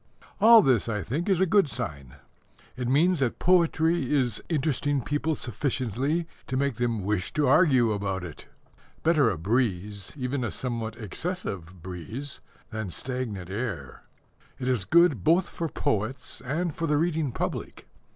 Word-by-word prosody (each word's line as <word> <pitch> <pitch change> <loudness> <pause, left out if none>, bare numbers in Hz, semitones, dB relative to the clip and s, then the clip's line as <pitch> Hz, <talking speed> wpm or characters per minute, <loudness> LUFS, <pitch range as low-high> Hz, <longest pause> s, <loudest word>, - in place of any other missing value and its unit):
All 225 +1 +8
this, 120 - +2
I 105 -3 -2
think, 160 - -2
is 190 -3 +3
a 190 - +4
good 195 -3 +3
sign. 70 - -5 0.6
It 125 0 -3
means 160 +6 +3
that 130 -4 0
poetry 165 -4 +2
is 125 -7 +1
interesting 145 -2 0
people 150 +2 -1
sufficiently 135 - -1 0.2
to 130 - -2
make 140 -4 0
them 115 -4 -1
wish 100 -2 -1
to 150 -2 +2
argue 130 -6 +5
about 100 -3 -2
it. 80 -4 -9 0.6
Better 155 -7 +4
a - - -2
breeze 100 0 -1
even 130 0 -2
a 120 - -1
somewhat 115 -3 -4
excessive 100 - -5
breeze 100 - -7 0.3
than 110 -3 -4
stagnant 110 -4 -4
air. 100 - -4 0.6
It 125 - -4
is 125 -8 +1
good 165 - +4
both 170 - +3
for 165 -1 -4
poets 125 +2 -2
and 160 +5 -1
for 165 +2 -2
the 150 -1 +2
reading 160 -3 0
public. - - -4
130 Hz, 150 wpm, -27 LUFS, 105-155 Hz, 0.6 s, All